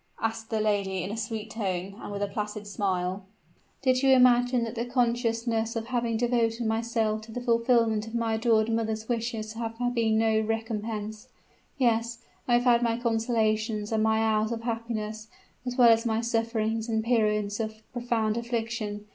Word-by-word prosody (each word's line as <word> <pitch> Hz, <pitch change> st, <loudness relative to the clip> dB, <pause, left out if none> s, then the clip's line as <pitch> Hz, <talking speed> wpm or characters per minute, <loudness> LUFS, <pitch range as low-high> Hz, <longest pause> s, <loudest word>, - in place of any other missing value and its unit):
asked 225 Hz, 0 st, -3 dB
the 220 Hz, -, 0 dB
lady 200 Hz, -4 st, 0 dB
in 195 Hz, -, -4 dB
a -, -, -3 dB
sweet 220 Hz, -1 st, -4 dB
tone, 190 Hz, -3 st, -3 dB
and -, -, -7 dB
with 205 Hz, 0 st, -2 dB
a -, -, 0 dB
placid 210 Hz, 0 st, -4 dB
smile: 190 Hz, -2 st, -2 dB, 0.6 s
"do 260 Hz, -, +5 dB
you 255 Hz, +1 st, +2 dB
imagine 245 Hz, -1 st, +5 dB
that 230 Hz, -1 st, -4 dB
the 235 Hz, -1 st, -2 dB
consciousness 235 Hz, -2 st, 0 dB
of 225 Hz, -1 st, -2 dB
having 235 Hz, -2 st, -1 dB
devoted 235 Hz, -1 st, +1 dB
myself 220 Hz, -1 st, 0 dB
to 220 Hz, +1 st, -12 dB
the 245 Hz, -, -4 dB
fulfillment 230 Hz, -2 st, +2 dB
of 225 Hz, -, -7 dB
my 230 Hz, -1 st, 0 dB
adored 220 Hz, -1 st, +3 dB
mother's 220 Hz, -1 st, -1 dB
wishes 225 Hz, -2 st, -2 dB
has 225 Hz, 0 st, -3 dB, 0.2 s
been 225 Hz, -2 st, +2 dB
no 220 Hz, -1 st, +3 dB
recompense? 220 Hz, -1 st, -3 dB, 0.5 s
Yes 230 Hz, -2 st, +1 dB, 0.3 s
I 245 Hz, -, +2 dB
have 240 Hz, -, +3 dB
had 240 Hz, -1 st, +4 dB
my 230 Hz, -1 st, +1 dB
consolations 225 Hz, -2 st, 0 dB
and 220 Hz, -1 st, +1 dB
my 220 Hz, 0 st, +3 dB
hours 220 Hz, 0 st, +1 dB
of 230 Hz, -1 st, -4 dB
happiness, 225 Hz, -2 st, -4 dB, 0.4 s
as 245 Hz, -, -3 dB
well 245 Hz, -2 st, +7 dB
as 225 Hz, 0 st, +5 dB
my 225 Hz, -1 st, 0 dB
sufferings 225 Hz, -1 st, -1 dB
and 220 Hz, -1 st, 0 dB
periods 210 Hz, -3 st, +1 dB
of 220 Hz, 0 st, -4 dB
profound 235 Hz, -3 st, 0 dB
affliction. 230 Hz, -3 st, -3 dB
225 Hz, 170 wpm, -27 LUFS, 215-235 Hz, 0.6 s, well